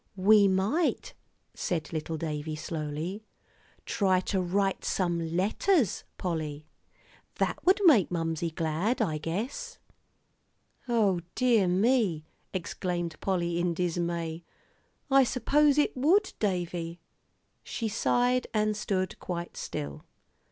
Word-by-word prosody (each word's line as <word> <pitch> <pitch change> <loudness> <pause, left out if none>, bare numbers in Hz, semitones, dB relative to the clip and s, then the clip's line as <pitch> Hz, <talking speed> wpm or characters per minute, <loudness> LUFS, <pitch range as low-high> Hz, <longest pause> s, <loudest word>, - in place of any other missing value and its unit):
"We 200 +2 +6
might," 200 - 0 0.4
said 165 -3 -3
little 160 0 -3
David, 155 -1 -4
slowly, 155 +5 -4 0.6
"try 190 -3 +2
to 190 0 -1
write 195 +2 0
some 170 -2 -1
letters, 220 - +1
Polly. 155 -4 -3 0.7
That - - -1
would 385 +2 +6
make 260 - +6
Mamsie 165 -1 -1
glad, 165 +9 0
I 155 -1 0
guess." 245 - -4 1.1
"O 210 -6 +3 0.2
dear 235 -7 +3
me," 190 -4 +2 0.3
exclaimed 175 -2 -3
Polly, 175 -3 0
in 175 -1 0
dismay, 170 -1 -2 0.7
"I 270 0 +7
suppose 280 +4 +3
it 295 - +2
would, 350 +10 +3
Davie." 175 -4 -2 0.6
She 230 - -4
sighed, 245 +3 +1
and 215 0 +2
stood 190 -3 -2
quite 175 -1 -5
still. 70 0 -5
185 Hz, 110 wpm, -29 LUFS, 165-220 Hz, 1.1 s, I